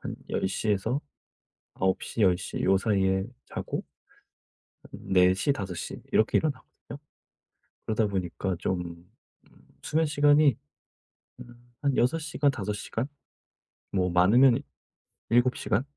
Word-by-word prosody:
한 -, -, -5 dB, 0.2 s
10:00 105 Hz, +3 st, -1 dB
에서 110 Hz, +7 st, 0 dB, 0.8 s
9:00 95 Hz, +4 st, -1 dB
10:00 90 Hz, -1 st, +1 dB
요 95 Hz, 0 st, +4 dB
사이에 95 Hz, -2 st, +1 dB, 0.2 s
자고 -, -, -5 dB, 1.0 s
한 -, -, -9 dB
4:00 95 Hz, +7 st, +4 dB
5:00 95 Hz, -7 st, -5 dB
이렇게 110 Hz, -, +3 dB
일어나거든요. 140 Hz, -1 st, -5 dB, 0.9 s
그러다 110 Hz, 0 st, +1 dB
보니까 95 Hz, -1 st, -2 dB
좀 90 Hz, 0 st, -4 dB, 0.7 s
수면 160 Hz, +1 st, +1 dB
시간이 145 Hz, -2 st, +4 dB, 0.8 s
음 120 Hz, 0 st, -14 dB, 0.2 s
한 140 Hz, -2 st, 0 dB
6 125 Hz, +7 st, +2 dB
시간 150 Hz, -2 st, 0 dB
5 105 Hz, -6 st, -3 dB
시간 110 Hz, +4 st, -4 dB, 0.9 s
뭐 90 Hz, -2 st, 0 dB
많으면 115 Hz, +9 st, +5 dB, 0.7 s
7 120 Hz, +2 st, +3 dB
시간 105 Hz, +6 st, 0 dB
105 Hz, 160 characters per minute, -27 LUFS, 95-130 Hz, 1.0 s, 많으면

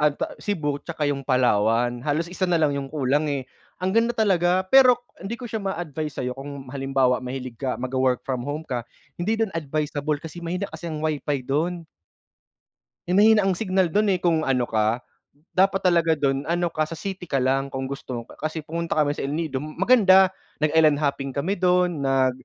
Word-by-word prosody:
ano 150 Hz, -1 st, +3 dB
'to, -, -, -1 dB, 0.2 s
Cebu 150 Hz, -8 st, -2 dB
tsaka 155 Hz, -3 st, -3 dB
yung 140 Hz, -1 st, -1 dB
Palawan. 120 Hz, -2 st, +2 dB
Halos 150 Hz, +4 st, 0 dB
isa 185 Hz, +1 st, -2 dB
na 170 Hz, -, +3 dB
lang 150 Hz, -3 st, +2 dB
yung 135 Hz, -1 st, -4 dB
kulang, 145 Hz, +1 st, 0 dB
eh. 135 Hz, -2 st, -3 dB, 0.3 s
Ang 185 Hz, +1 st, -1 dB
ganda 230 Hz, +1 st, +3 dB
talaga. 185 Hz, -3 st, +2 dB
Pero 255 Hz, +2 st, +7 dB, 0.2 s
hindi 205 Hz, +5 st, -5 dB
ko 250 Hz, -, -9 dB
siya 220 Hz, -1 st, -4 dB
maa-advice 155 Hz, -6 st, -4 dB
sa'yo 125 Hz, -1 st, -2 dB
kung 140 Hz, 0 st, -8 dB
halimbawa 135 Hz, -2 st, +1 dB
mahilig 130 Hz, -1 st, -6 dB
ka 130 Hz, -2 st, -1 dB
magwo-work 130 Hz, 0 st, 0 dB
from 130 Hz, -2 st, -2 dB
home 145 Hz, +3 st, -4 dB
ka, 125 Hz, -1 st, -2 dB, 0.4 s
hindi 215 Hz, +6 st, 0 dB
dun 220 Hz, -3 st, 0 dB
advisable 150 Hz, -1 st, -2 dB
kasi 165 Hz, +2 st, -9 dB
mahina 175 Hz, +3 st, -3 dB
kasi 170 Hz, -, -6 dB
ang 155 Hz, -2 st, -4 dB
WiFi 150 Hz, -2 st, -1 dB
dun. 165 Hz, +5 st, -1 dB, 1.2 s
Eh, 180 Hz, -, +1 dB
mahina 210 Hz, 0 st, +5 dB
ang 190 Hz, -, +2 dB
signal 190 Hz, -1 st, +1 dB
dun, 205 Hz, +4 st, +2 dB
eh. 185 Hz, -, +2 dB
Kung 170 Hz, -2 st, +1 dB
ano 125 Hz, -4 st, +1 dB
ka, 110 Hz, +1 st, +1 dB, 0.5 s
dapat 195 Hz, +1 st, +2 dB
talaga 170 Hz, -3 st, +3 dB
dun 140 Hz, -1 st, -1 dB
ano 175 Hz, 0 st, 0 dB
ka, 155 Hz, -1 st, -1 dB
sa 165 Hz, -, -6 dB
city 185 Hz, +1 st, -6 dB
ka -, -, -2 dB
lang 135 Hz, +1 st, +1 dB
kung 135 Hz, -1 st, -5 dB
gusto 130 Hz, -3 st, -5 dB, 0.2 s
Kasi 155 Hz, +1 st, -3 dB
pumunta 170 Hz, +2 st, -3 dB
kami 150 Hz, -2 st, +2 dB
sa 145 Hz, -, -6 dB
El 145 Hz, -, -2 dB
Nido, 155 Hz, -5 st, -2 dB
maganda. 190 Hz, -, +4 dB, 0.3 s
Nag-island 155 Hz, -1 st, +4 dB
hopping 140 Hz, -2 st, -2 dB
kami 175 Hz, +8 st, -1 dB
dun, 180 Hz, -2 st, +2 dB
nag 135 Hz, -1 st, +2 dB
155 Hz, 190 wpm, -24 LUFS, 135-180 Hz, 1.2 s, Pero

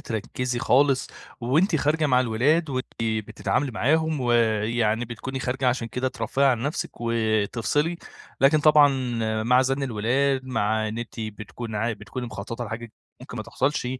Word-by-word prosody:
تركّزي 120 Hz, +3 st, -3 dB
خالص، 135 Hz, +2 st, +3 dB, 0.3 s
وأنتِ 155 Hz, -, +2 dB
خارجة 155 Hz, +2 st, +1 dB
مع 125 Hz, -3 st, +4 dB
الولاد 135 Hz, +7 st, +2 dB
وأنتِ 130 Hz, -1 st, -2 dB, 0.2 s
بتتعاملي 110 Hz, +5 st, -1 dB
معاهم، 155 Hz, +6 st, +1 dB
ويعني 115 Hz, -1 st, +1 dB
بتكوني 125 Hz, +3 st, -6 dB
خارجة 130 Hz, +1 st, 0 dB
عشان 120 Hz, -2 st, -1 dB
كده 125 Hz, +3 st, -1 dB
ترفهي 125 Hz, +3 st, -1 dB
عن 120 Hz, -4 st, +2 dB
نَفسِك 145 Hz, +4 st, -2 dB
وتفصلي، 115 Hz, +7 st, 0 dB, 0.4 s
لكن 140 Hz, +3 st, +5 dB
طبعًا 150 Hz, -1 st, +7 dB, 0.5 s
مع 125 Hz, +3 st, +4 dB
زَن 135 Hz, +1 st, -1 dB
الولاد، 130 Hz, +3 st, 0 dB
مع 110 Hz, -3 st, 0 dB
إن 110 Hz, +2 st, -5 dB
أنتِ 120 Hz, 0 st, -6 dB
بتكوني 110 Hz, +1 st, -6 dB
عا 110 Hz, +3 st, 0 dB
بتكوني 110 Hz, +4 st, -6 dB
مخططة 115 Hz, +2 st, -6 dB
لحاجة 115 Hz, 0 st, -7 dB, 0.3 s
ممكن -, -, -9 dB
ما -, -, -3 dB
تحصلش، 135 Hz, -1 st, -1 dB
125 Hz, 145 wpm, -25 LUFS, 110-135 Hz, 0.5 s, طبعًا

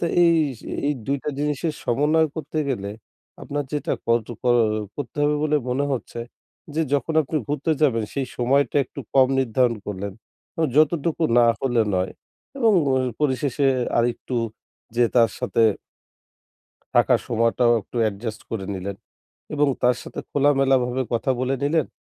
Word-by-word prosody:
তো -, -, 0 dB, 0.2 s
এই, 170 Hz, -1 st, +5 dB, 0.5 s
এই, 150 Hz, -, +2 dB
২ 140 Hz, +1 st, +1 dB
টা 150 Hz, -, -1 dB
জিনিসের 150 Hz, +2 st, -1 dB
সমন্বয় 150 Hz, +5 st, +2 dB
করতে 155 Hz, 0 st, -4 dB
গেলে 100 Hz, -7 st, -2 dB, 0.5 s
আপনার 145 Hz, 0 st, -3 dB
যেটা 150 Hz, -, -1 dB
কট 115 Hz, -1 st, +2 dB, 0.2 s
কর 120 Hz, -1 st, +4 dB, 0.4 s
করতে 145 Hz, -2 st, -6 dB
হবে 150 Hz, 0 st, +2 dB
বলে 150 Hz, 0 st, +2 dB
মনে 135 Hz, +3 st, +1 dB
হচ্ছে, 120 Hz, -2 st, -4 dB, 0.5 s
যে 160 Hz, -, +1 dB
যখন 145 Hz, +3 st, -1 dB
আপনি 155 Hz, +3 st, -3 dB
ঘুরতে 145 Hz, +2 st, -1 dB
যাবেন 115 Hz, -7 st, +3 dB
সেই 135 Hz, -2 st, -1 dB
সময়টা 135 Hz, +4 st, +2 dB
একটু -, -, -9 dB
কম 130 Hz, -1 st, +6 dB
নির্ধারণ 125 Hz, -1 st, +1 dB
করলেন। 100 Hz, -1 st, -4 dB, 0.6 s
যতটুকু 155 Hz, +1 st, +2 dB, 0.2 s
না 120 Hz, -, +6 dB
হলে 120 Hz, -4 st, +2 dB
নয় 90 Hz, 0 st, 0 dB, 0.5 s
এবং 225 Hz, -4 st, +4 dB, 0.5 s
পরিশেষে 140 Hz, -1 st, +1 dB, 0.3 s
আরেকটু 120 Hz, +1 st, -1 dB, 0.6 s
যেয়ে 120 Hz, -1 st, +3 dB
তার 115 Hz, -1 st, +5 dB
সাথে 120 Hz, -2 st, +1 dB, 1.3 s
থাকার -, -, +5 dB
সময়টাও 115 Hz, +1 st, +3 dB
একটু 120 Hz, -, -12 dB
অ্যাডজাস্ট 110 Hz, +1 st, -3 dB
করে 95 Hz, -4 st, -3 dB
নিলেন। 95 Hz, +1 st, -5 dB, 0.6 s
এবং 145 Hz, -1 st, +3 dB
তার 125 Hz, 0 st, +4 dB
সাথে -, -, -7 dB
খোলামেলাভাবে 135 Hz, -3 st, +2 dB
কথা 115 Hz, +3 st, 0 dB
বলে 130 Hz, +1 st, 0 dB
নিলেন। 155 Hz, 0 st, +2 dB
130 Hz, 140 wpm, -23 LUFS, 115-145 Hz, 1.3 s, কম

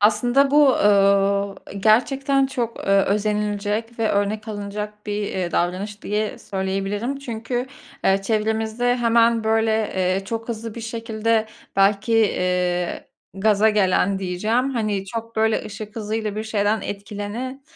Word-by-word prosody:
Aslında 240 Hz, +6 st, +3 dB
bu, 290 Hz, -2 st, +6 dB
ööö, 200 Hz, 0 st, +3 dB
e, -, -, -10 dB
gerçekten 270 Hz, +6 st, +3 dB
çok, 245 Hz, -4 st, -3 dB
eee, -, -, -3 dB
özenilecek 210 Hz, +2 st, -1 dB
ve 225 Hz, -1 st, +1 dB
örnek 210 Hz, +2 st, -1 dB
alınacak 210 Hz, 0 st, -6 dB
bir, 210 Hz, 0 st, -2 dB
eee, 185 Hz, -3 st, -2 dB
davranış 195 Hz, +4 st, -2 dB
diye 210 Hz, +1 st, -2 dB
söyleyebilirim. 195 Hz, +7 st, -3 dB
Çünkü, 245 Hz, -1 st, -4 dB, 0.4 s
eee, 195 Hz, 0 st, +3 dB
çevremizde 220 Hz, +3 st, 0 dB
hemen, 230 Hz, -1 st, +3 dB
böyle, 220 Hz, 0 st, +1 dB
eee, 185 Hz, +1 st, 0 dB
çok 225 Hz, +3 st, -5 dB
hızlı 225 Hz, -1 st, -5 dB
bir 235 Hz, -, -6 dB
şekilde 225 Hz, -1 st, -1 dB, 0.3 s
belki, 200 Hz, +3 st, +3 dB
eee, 180 Hz, -4 st, 0 dB, 0.3 s
gaza 210 Hz, +2 st, +3 dB
gelen 195 Hz, -1 st, +2 dB
diyeceğim, 215 Hz, +8 st, 0 dB
hani, 215 Hz, -6 st, -1 dB
çok, 230 Hz, +2 st, -6 dB
böyle, 220 Hz, 0 st, +2 dB
ışık 210 Hz, +1 st, -8 dB
hızıyla 215 Hz, -1 st, -3 dB
bir 215 Hz, -, -2 dB
şeyden 215 Hz, 0 st, 0 dB
etkilenen 205 Hz, +6 st, -5 dB
215 Hz, 130 wpm, -22 LUFS, 200-230 Hz, 0.4 s, bu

